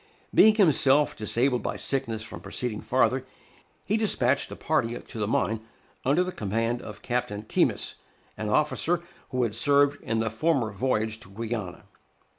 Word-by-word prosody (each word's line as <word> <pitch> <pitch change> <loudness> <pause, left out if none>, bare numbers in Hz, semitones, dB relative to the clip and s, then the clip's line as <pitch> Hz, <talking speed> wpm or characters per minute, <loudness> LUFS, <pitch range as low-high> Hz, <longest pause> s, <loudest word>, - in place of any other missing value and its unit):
Being 220 0 +7
himself 150 -7 +4
disabled 120 +3 +1
by - - -3
sickness 115 -5 -2
from - - -9
proceeding 115 -4 -4
farther, 130 0 +2 0.6
he 210 +5 +1
despatched 140 - +1
a - - -7
party 120 -6 0
to 115 - -9
the 105 - 0
mine 110 0 0 0.4
under 145 +7 +3
the 185 - -4
command 115 - -1
of 105 -3 -10
Captain 120 -4 -2
Keymis, 110 - 0 0.4
an 110 -1 -4
officer 155 +7 +1 0.3
who 125 -1 0
had 115 -3 -1
served 140 +4 +3
in 115 - -2
the 110 -1 0
former 125 -1 +1
voyage 110 0 -1
to 95 - -15
Guiana. 110 -2 -5
120 Hz, 155 wpm, -27 LUFS, 110-140 Hz, 0.6 s, Being